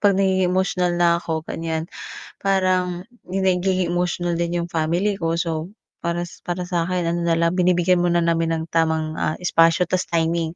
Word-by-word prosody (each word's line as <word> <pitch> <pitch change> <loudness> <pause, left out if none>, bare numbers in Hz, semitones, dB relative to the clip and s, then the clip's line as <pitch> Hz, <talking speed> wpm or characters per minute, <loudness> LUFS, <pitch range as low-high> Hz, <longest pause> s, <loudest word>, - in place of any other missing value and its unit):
'pag 200 -2 +4
nagiging 190 -2 +2
emosyonal 180 -1 +1
na 170 -1 +3
ako 160 -2 -3
ganyan, 160 -1 -3 0.6
parang 185 -2 +1 0.2
yung 190 +1 -1
nagiging 185 -1 +1
emosyonal 175 0 -1
din 170 0 -1
yung - - -12
family 170 +6 +1
ko, 165 0 0
so, 165 0 -2 0.3
para 170 0 -1 0.2
para 180 +1 -2
sakin 175 -1 -1
ano 170 0 -1
na 165 - +3
lang, 170 0 +2
binibigyan 180 0 +3
mo 175 - +2
na 170 0 +2
namin 165 0 +1
ng 160 0 -3
tamang, 160 -1 0
ah, 155 - 0
espasyo 165 -1 +3
'tas 185 +1 -1
timing. 165 0 0
175 Hz, 175 wpm, -22 LUFS, 165-180 Hz, 0.6 s, pag